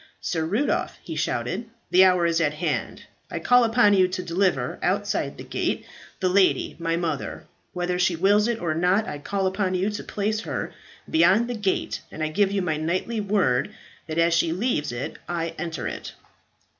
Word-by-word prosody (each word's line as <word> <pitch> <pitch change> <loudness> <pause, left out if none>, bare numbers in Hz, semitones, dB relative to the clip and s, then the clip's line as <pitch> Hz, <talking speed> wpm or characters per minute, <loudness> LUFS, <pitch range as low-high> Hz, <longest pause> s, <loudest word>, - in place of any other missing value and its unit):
"Sir 160 -2 -2
Rudolph," 215 - 0
he - - -6
shouted, 230 -1 -2 0.2
"the 185 +1 +7
hour 180 -2 +4
is 170 0 +2
at 150 -2 +1
hand. 155 -1 -2 0.3
I - - -4
call 245 0 +4
upon 225 -2 +4
you 185 -2 +5
to 185 0 -4
deliver, 180 +2 0
outside - - -1
the - - -8
gate, - - -2 0.3
the 185 - +1
lady, 190 +1 +2
my 165 0 0
mother. 165 -5 -3 0.3
Whether 180 0 -1
she 180 -1 +2
wills 205 +5 +3
it 235 -1 -1
or 170 -3 -1
not, 180 +6 +2
I 145 - -5
call 195 +6 -2
upon 190 0 0
you 190 +3 0
to 210 - -5
place 215 +1 -1
her - - -4 0.3
beyond 190 +8 +4
the 245 - -3
gate, 210 -4 -1
and 155 - -5
I 155 - 0
give 195 +4 +2
you 200 -2 0
my 160 -3 0
knightly 185 +8 -1
word 195 -11 +1 0.3
that 160 0 -4
as 170 0 +3
she 170 -1 +2
leaves 175 - -1
it 120 +2 -5
I 165 -1 -2
enter 165 -2 -3
it." - - -6
180 Hz, 190 wpm, -25 LUFS, 165-205 Hz, 0.3 s, the